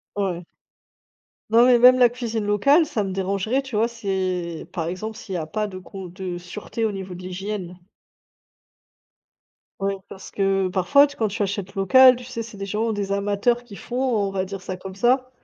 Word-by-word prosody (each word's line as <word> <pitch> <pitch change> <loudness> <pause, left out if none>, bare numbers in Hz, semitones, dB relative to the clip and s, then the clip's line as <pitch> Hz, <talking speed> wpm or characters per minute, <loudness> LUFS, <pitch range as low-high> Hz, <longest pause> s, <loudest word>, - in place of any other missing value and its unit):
Ouais. 180 -4 -2 1.0
Non, 230 +2 +6
mais 245 -2 +5
même 250 +1 +8
la 245 -2 +6
cuisine 230 -3 -3
locale, 275 - +4
ça 215 -7 -2
me 190 - -4
dérangerait 195 +7 0
tu 265 -5 -8
vois? 225 +2 +3
C'est 185 -7 -3
par 165 -2 -2
exemple 215 +5 -5
s'il 195 -6 -7
y - - 0
a 160 - -3
pas 210 +6 -2
de 185 -2 -8
con 190 0 -9
de 180 0 -6
sûreté 210 +5 -6
au 215 - 0
niveau 190 -2 -6
de 180 - -10
l'hygiène. 185 -1 -5 2.0
Ouais, 195 0 -1
parce 190 - -11
que 195 -1 +1
parfois, 280 +11 +5
tu 285 0 -9
quand 220 - +1
tu 205 +1 -2
achètes 195 0 -4
local, 255 +6 +7
tu 250 - -10
sais 240 -2 -5
c'est 225 -2 -9
des 195 - -5
gens, 220 +3 -1
des 200 -1 -3
amateurs 205 +4 +1
qui 215 -5 -12
font, 245 - -8 0.3
on - - -4
va 190 -1 -1
dire 195 0 -6
ça 185 0 -5
comme 190 +1 -9
ça 255 +4 +2
200 Hz, 200 wpm, -23 LUFS, 190-235 Hz, 2.0 s, même